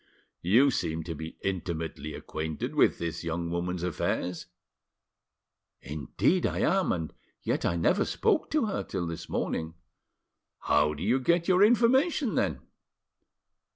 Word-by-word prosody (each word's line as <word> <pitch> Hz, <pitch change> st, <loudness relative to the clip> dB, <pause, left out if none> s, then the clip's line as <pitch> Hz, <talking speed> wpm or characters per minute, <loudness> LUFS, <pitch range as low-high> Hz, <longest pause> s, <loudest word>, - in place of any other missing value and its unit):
"You 120 Hz, +11 st, +5 dB
seem 80 Hz, -8 st, -2 dB
to 85 Hz, -, -5 dB
be 80 Hz, +1 st, -8 dB
intimately 80 Hz, -5 st, -3 dB
acquainted 80 Hz, 0 st, -4 dB
with -, -, +4 dB
this 85 Hz, 0 st, -4 dB
young 85 Hz, 0 st, -3 dB
woman's 90 Hz, 0 st, -2 dB
affairs." 90 Hz, 0 st, -2 dB, 1.3 s
"Indeed 75 Hz, -, 0 dB
I -, -, -2 dB, 0.2 s
am, 190 Hz, -, 0 dB
and 80 Hz, -3 st, -3 dB, 0.3 s
yet -, -, -1 dB
I 85 Hz, -, 0 dB
never 180 Hz, -, +2 dB
spoke 420 Hz, -8 st, +1 dB
to 305 Hz, -5 st, +1 dB
her 210 Hz, -, -2 dB
till 95 Hz, -3 st, -3 dB
this 85 Hz, -1 st, -6 dB
morning." 80 Hz, +1 st, -2 dB, 0.9 s
"How 75 Hz, +1 st, +2 dB
did 75 Hz, -, -6 dB
you 120 Hz, +7 st, +2 dB
get 170 Hz, +6 st, +2 dB
your 185 Hz, +1 st, +5 dB
information, 245 Hz, -, +3 dB
then?" -, -, 0 dB
85 Hz, 135 wpm, -28 LUFS, -, 1.3 s, You